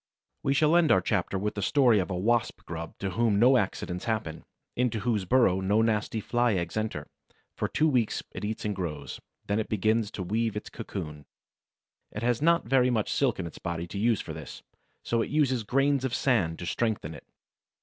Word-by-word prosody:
We 135 - +1
shall 155 +3 +4
end 170 -3 +4
our 95 - +6
chapter 95 0 -1
with 105 +2 -2
the 100 - -4
story 120 -1 +4
of 90 - -1
the 95 - -3
Wasp 115 +6 0
grub 80 -1 -7
to 95 -1 -3
whom 110 +1 +2
no 125 +5 +6
accidents 95 -4 -1
happen, 105 -9 -3 0.3
into 120 -3 0
whose 105 -3 0
burrow 105 -4 +3
no 105 +4 +2
nasty 110 0 0
Fly 120 0 +1
eggs 85 -2 -3
enter. 110 0 -3 0.5
For - - -1
two 155 - +1
weeks 125 -7 +1
it - - -7
eats 110 +1 -3
and 105 -1 -1
grows; 75 -6 -5 0.3
then 100 +2 0
it 110 - -3
begins 110 +1 +1
to 95 - -4
weave 110 +3 -1
its 105 - -7
cocoon. 75 -6 -7 0.8
It 105 - -6
has 120 0 +1
not 170 +2 +3
very 125 0 +4
much 110 -4 0
silk 135 -3 +1
in 95 - -4
its 85 - -9
body 85 -1 -3
to 100 - -5
use 115 0 +2
for 80 - -7
this, 80 -1 -9 0.4
so 115 -1 0
it - - -2
uses 135 -5 +2
grains 135 +4 +1
of 130 -2 -1
sand 95 -12 +1
to 90 - -6
strengthen 90 -2 -1
it. 75 - -13
110 Hz, 205 wpm, -28 LUFS, 95-120 Hz, 0.8 s, our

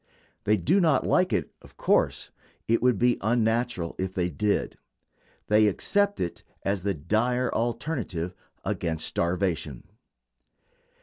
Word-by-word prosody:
They 105 +1 +4
do 155 - +2
not 155 -6 +3
like 185 0 +3
it, - - -1
of - - -18
course; - - +1 0.4
it 115 +1 +2
would 125 -3 +3
be 120 +2 +2
unnatural 110 -4 0
if 95 0 -3
they 90 -1 0
did. 105 +3 -1 0.7
They 105 0 +4
accept 200 - +1
it 85 - -3 0.2
as 100 -1 0
the 100 0 -1
dire 120 - 0
alternative 115 - -2 0.3
against 80 -2 -2
starvation. 85 -7 -1
105 Hz, 125 wpm, -27 LUFS, 90-125 Hz, 0.7 s, They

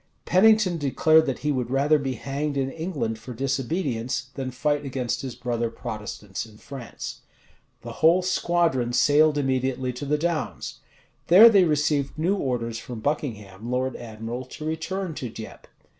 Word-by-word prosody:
Pennington 195 -2 +4
declared 155 +3 +4
that 135 - -2
he 150 - +3
would 125 -3 -1
rather 145 +3 +3
be 135 -2 -2
hanged 140 +3 -3
in 135 -1 0
England 155 -10 -3
for 120 +2 -9
disobedience, 130 -1 -2
than 135 -2 -4
fight 145 +3 0
against 130 -3 -2
his 130 -3 -6
brother 120 -1 -2
Protestants 105 -3 -6
in 110 -2 -14
France. 130 -2 -8 0.6
The - - -6
whole 170 +3 +5
squadron 170 -9 +1
sailed 150 +3 +4
immediately 130 -2 0
to 125 +4 -6
the 150 +1 +2
Downs. 165 -1 -3 0.5
There 205 +7 +10
they 200 -5 +5
received 150 -3 0
new 175 +6 +1
orders 120 - -2
from 120 0 -7
Buckingham, 110 -6 -3
lord 130 +1 -1
admiral, 115 +2 -6
to 150 +4 -9
return 165 +3 -3
to 125 -5 -5
Dieppe. 110 0 -10
135 Hz, 155 wpm, -25 LUFS, 120-155 Hz, 0.6 s, There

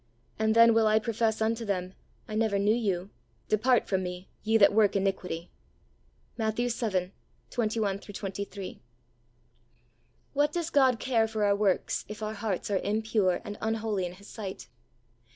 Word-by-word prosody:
And 220 0 +2
then 230 0 +7
will 225 -1 +4
I 215 0 +4
profess 220 0 0
unto 225 +1 0
them, 185 -3 -2 0.3
I 215 - -7
never 215 -2 +1
knew 205 +2 +3
you, 200 -5 -1 0.4
depart 240 +3 +3
from 190 -1 +1
Me, 180 0 -6
ye 220 +1 +3
that 205 -1 +6
work 210 -2 +4
iniquity" 190 -3 -2 0.9
{Matt. 220 -1 0
vii. 225 -6 -1 0.4
21 215 -4 0
23). 200 -1 -6 1.5
W'hat 290 +1 +2
does 335 -1 -2
God 260 -5 +4
care 230 -4 +2
for 220 -1 -1
our 200 0 +4
works 200 -2 +1
if 210 +1 -7
our 215 0 -2
hearts 205 -2 -3
are 195 - +2
impure 210 -3 +1
and 205 - -7
unholy 220 -4 -1
in 175 - -8
His 200 +3 -15
sight 190 - -7
215 Hz, 150 wpm, -29 LUFS, 195-225 Hz, 1.5 s, then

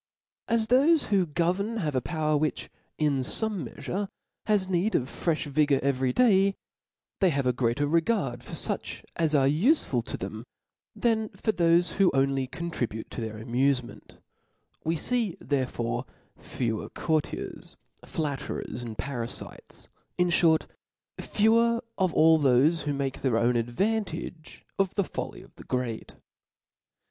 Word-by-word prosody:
As 230 -1 +2
thofe 280 +7 +4
who 190 -3 +3
govern 180 +8 0
have 155 -8 -1
a 130 - +1
power 155 -1 0
which, 150 +1 -1 0.3
in 150 -3 +1
fome 205 - -1
meafure, 200 +2 -4 0.4
has 205 -3 +2
need 190 +4 +1
of - - +3
frefh 165 +2 -1
vigor 145 -1 +2
every 130 -2 +1
day, 195 - +4 0.6
they 190 - +4
have 140 -4 0
a 125 - +3
greater 125 +3 +1
regard 150 - 0
for - - -10
fiich - - -2
as 160 -2 +1
are 135 -2 +4
ufeful 205 - +2
to - - -4
them,^ - - -6 0.5
than 220 -2 +1
for 220 - 0
thofe 170 -2 +3
who 195 -3 +5
only 135 -1 +1
contribute 125 -9 -4
to - - -5
their 110 -1 -4
amufe 125 +4 +1
ment: 120 - -13 0.7
we 165 +1 0
fee 225 +2 0
therefore 125 -3 -2 0.3
fewer 115 -4 -3
courtiers, 155 -2 -3 0.3
flatterers, 140 -5 -4
and 115 -3 -7
parafites; 120 -4 -6 0.3
in 180 0 +3
fhort, 165 -2 +4 0.5
fewer 230 +2 +3 0.2
of 185 -2 +2
all 160 0 +6
thofe 145 +4 +3
who 145 - 0
make 140 -1 -3
their 125 -4 +2
own 120 +1 +2
advantage 165 - -2
of 195 -2 +1
the 200 - +2
folly - - -6
of - - -19
the - - -11
great. 125 -3 -3
155 Hz, 145 wpm, -27 LUFS, 130-195 Hz, 0.7 s, all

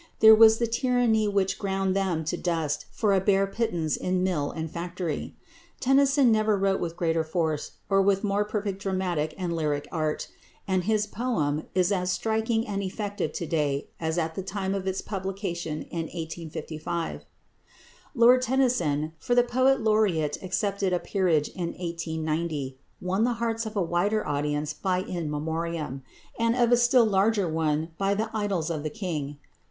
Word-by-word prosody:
There 220 0 +9
was 220 0 +7
the 235 - +1
tyranny 235 -2 +2
which 200 -2 0
ground 195 -2 0
them 185 -5 0
to 160 - -1
dust 165 -4 -2
for 210 -3 +1
a 190 - +3
bare 195 0 +3
pittance 195 -7 -1
in 180 0 -1
mill 165 -6 0
and 160 -1 -4
factory. 170 -2 -4 0.4
Tennyson 270 -1 +4
never 215 -1 +3
wrote 195 0 +1
with 170 -1 -4
greater 165 -1 +1
force 160 -2 -2
or 195 -1 +3
with 195 +1 +2
more 205 0 +1
perfect 205 -2 -3
dramatic 180 -6 -1
and 175 -3 -2
lyric 150 -3 -1
art, 155 -2 -2 0.4
and 185 -2 0
his 215 0 +2
poem 195 - -1
is 185 +1 +3
as 180 -2 0
striking 220 +4 0
and 200 -1 -3
effective 200 -4 -3
to 170 - -3
day 150 -3 -1
as 160 0 -2
at 165 -1 -1
the 190 - -4
time 195 0 -3
of 195 -1 -3
its 190 0 -1
publication 190 -5 -4
in 165 -1 -4
1855. 165 0 -5 0.9
Lord 245 +1 +6
Tennyson 200 - +1
for 245 - 0
the 245 - +6
Poet 260 +2 +2
Laureate 205 -9 +1
accepted 195 0 -1
a 180 - +2
peerage 175 -8 +1
in 175 -2 -4
1890 160 -4 -3 0.3
won 190 +4 +1
the 245 +1 +2
hearts 230 -1 -2
of 220 - -7
a 200 - +1
wider 180 +6 0
audience 150 +1 -1
by 180 +4 -1
"In 170 -5 -4
Memoriam," 160 -2 -3 0.4
and 230 0 +2
of 240 -1 +3
a 245 - +6
still 240 0 +5
larger 200 -1 +2
one 160 0 0
by 200 0 +2
"The 220 +2 -3
Idylls 195 -6 -1
of 155 -3 -2
the 155 - -3
King." 150 -6 -4
185 Hz, 170 wpm, -27 LUFS, 160-215 Hz, 0.9 s, There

